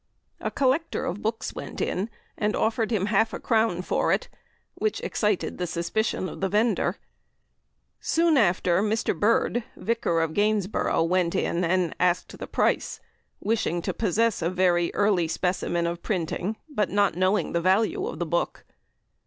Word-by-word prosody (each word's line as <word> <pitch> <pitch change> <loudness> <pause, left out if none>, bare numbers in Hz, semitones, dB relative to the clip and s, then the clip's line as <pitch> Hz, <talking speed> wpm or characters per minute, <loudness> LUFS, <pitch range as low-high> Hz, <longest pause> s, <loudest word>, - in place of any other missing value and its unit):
A - - -2
collector 280 +4 0
of 185 +4 -3
books 225 +1 -2
went - - -7
in 195 +5 -1 0.3
and 210 0 0
offered 225 0 +1
half 210 0 +1
a - - -4
crown 220 -6 +1
for - - +1
it, - - 0 0.4
which 435 - -1
excited 210 -4 -1
the 180 - -1
suspicion 185 +4 -1
of - - -8
the 195 - +1
vendor. 220 +4 +1 1.0
Soon 330 -1 +2
after 185 -5 +3
Mr. 215 +1 0
Bird, 230 +2 +2
Vicar 230 -8 0
of 160 -1 -1
Gainsborough, 205 -4 +1
went 175 0 +1
in 170 +2 0
and 180 0 +1
asked 180 0 +1
the - - -6
price, - - 0 0.4
wishing 210 -6 0
to - - -2
possess 225 +1 +1
a 165 - +1
very 180 -2 +2
early 200 -5 +2
specimen 175 0 -1
of 170 0 -3
printing, 190 +2 -2
but 230 -10 -1
not 205 0 +2
knowing 185 +3 +1
the 170 - 0
value 220 - +2
of - - -5
the - - -2
book. - - -2
205 Hz, 155 wpm, -26 LUFS, 175-225 Hz, 1.0 s, after